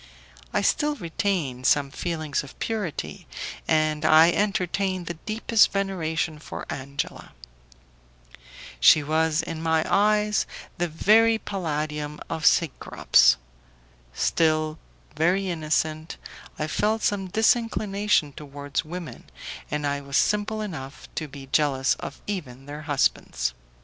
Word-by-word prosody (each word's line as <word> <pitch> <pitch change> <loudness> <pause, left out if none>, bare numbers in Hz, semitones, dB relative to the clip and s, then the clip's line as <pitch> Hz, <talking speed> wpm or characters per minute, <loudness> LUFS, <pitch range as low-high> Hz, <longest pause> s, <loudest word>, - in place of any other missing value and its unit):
I - - 0
still 300 0 +2
retained 165 - -2
some 140 -2 +3
feelings 155 -3 -2
of 140 - -13
purity, 210 -8 -4 0.4
and 155 -1 +2
I 160 +2 +7
entertained 190 -2 0
the 170 - -4 0.2
deepest 220 0 +3
veneration 165 -5 -2
for - - -7
Angela. 140 +1 -5 1.5
She 150 - +7
was 160 +2 +1
in 165 -1 -5
my 160 -1 +1
eyes 210 +1 +2 0.3
the 175 - +1
very 220 +8 +4
palladium 150 -6 -3
of 160 -1 +1
Cecrops. 165 - +4 0.7
Still 155 - +1 0.4
very 180 +4 +1
innocent, 155 0 -1 0.4
I 150 - -1
felt 210 +7 0
some 195 -2 0
disinclination 210 - +1
towards 145 -1 -4
women, 170 +1 -8 0.4
and 150 0 -2
I 140 0 -1
was 140 0 -1
simple 210 +1 +1
enough 155 -10 -7
to 155 - -3
be 135 -1 -10
jealous 135 -1 +2
of - - -8
even 135 -10 -5
their 145 +1 -7
husbands. 135 - 0
160 Hz, 115 wpm, -25 LUFS, 150-195 Hz, 1.5 s, I